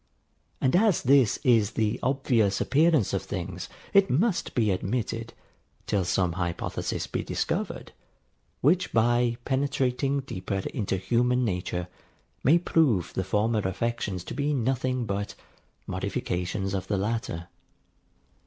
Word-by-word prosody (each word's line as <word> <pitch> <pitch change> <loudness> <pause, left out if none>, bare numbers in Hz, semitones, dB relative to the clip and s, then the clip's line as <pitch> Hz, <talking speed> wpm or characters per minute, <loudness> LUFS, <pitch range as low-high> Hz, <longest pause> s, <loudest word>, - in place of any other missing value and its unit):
And 130 +2 +2
as 205 -2 +3
this 130 -4 +4
is 115 -4 +3
the 110 -1 0
obvious 125 -7 +1
appearance 155 - +3
of - - 0
things, - - -5 0.2
it 200 -1 +5
must 185 - +1
be 110 -4 +3
admitted, 115 +4 -2 0.5
till 100 -3 0
some 90 0 +1
hypothesis 85 -1 -3
be - - -3
discovered, - - -3 0.7
which 175 +7 +3
by 120 +1 +3
penetrating 135 0 0
deeper 95 -5 -4
into 100 -6 -1
human 125 +6 +1
nature, 90 -3 -2 0.6
may 150 +7 +6
prove 145 - +2
the 95 - -1
former 105 +4 +1
affections 100 -1 -2
to - - -7
be 145 +1 0
nothing 130 0 0
but 100 0 -3 0.5
modifications 95 +2 -2
of 95 -1 -3
the 100 - 0
latter. 100 -5 -2
115 Hz, 125 wpm, -27 LUFS, 95-135 Hz, 0.7 s, may